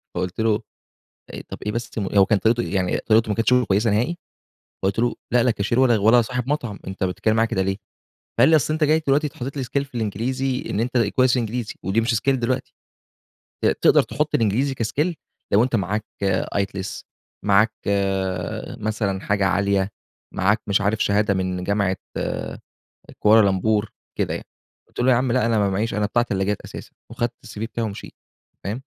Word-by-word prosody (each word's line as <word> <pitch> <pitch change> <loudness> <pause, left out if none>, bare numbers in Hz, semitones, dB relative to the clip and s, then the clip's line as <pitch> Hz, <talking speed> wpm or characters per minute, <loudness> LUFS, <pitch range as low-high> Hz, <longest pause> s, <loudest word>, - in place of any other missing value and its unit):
فقلت 90 +2 -3
له 110 0 +2 0.9
طب - - -6
ايه 105 - 0
بس؟ 115 0 -4
هو 100 0 +3
كان 105 +1 +2
طريقته 115 +4 +2
يعني 95 -2 0
طريقته 110 0 +2
ما 105 - 0
كانتش 115 +2 +2
كويسة 115 -3 +2
نهائي، 120 +12 0 0.7
فقلت 95 +3 0
له: 120 0 +1 0.2
"لأ 120 - +5
لا 125 - +3
كاشير 110 +3 0
ولا 120 -2 +5
صاحب 125 +2 -3
مطعم، 120 -9 -2
أنتَ 95 +1 -4
بتتكلم 95 +4 0
معايا 115 0 +2
كده 95 - 0
ليه؟" 95 +1 -1 0.6
فقال 130 +6 +6
لي: 160 - +6
"أصل 155 0 +2
أنتَ 155 0 0
جاي 155 +2 +3
دلوقتي 145 +2 +2
حاطط 135 +3 -5
لي 135 - -1
Skill 140 +3 -1
في 125 - -17
الإنجليزي 125 +5 -1
إن - - -1
أنتَ 125 +2 0
كويس 125 +3 +3
في - - +2
الإنجليزي 115 0 -3
ودي 100 +4 +1
مش 115 +1 0
Skill 135 +5 +2
دلوقتي، 125 +1 -2 0.9
ت - - +5 0.2
تقدر - - +6
تحط 150 0 -2
الإنجليزي 120 +5 +1
كskill 145 +9 -1 0.4
لو 105 +3 +5
أنتَ 125 -2 0
معاك 105 +2 -1 0.5
IELTS، 100 -1 -3 0.4
معاك 105 +2 +4
آآ 95 -2 -1
مثلًا 105 -3 -1
حاجة 100 -1 +1
عالية، 100 0 +1 0.4
معاك 100 +4 +2
مش 100 0 +3
عارف 105 +2 +1
شهادة 100 0 +2
من 90 -1 -2
جامعة 100 -1 +1 0.2
آآ - - -3 0.6
كوالالمبور 105 0 +3 0.3
كده - - 0
يعني" - - -6 0.4
قلت - - -11
له: 130 +1 +4
"يا - - +5
عم 125 0 +1
لأ 125 -2 +2
أنا 115 -2 +2
ما 100 - +2
معيش 105 +4 -1
أنا 105 +1 0
بتاع 120 +3 +2
تلاجات 100 -2 -1
أساسًا" - - -10 0.2
وأخدت 120 0 -1
الCV 105 - -9
بتاعي 115 0 -3
ومشيت، 100 - -8 0.5
فاهم؟ 105 +6 -3
110 Hz, 180 wpm, -22 LUFS, 100-125 Hz, 0.9 s, فقال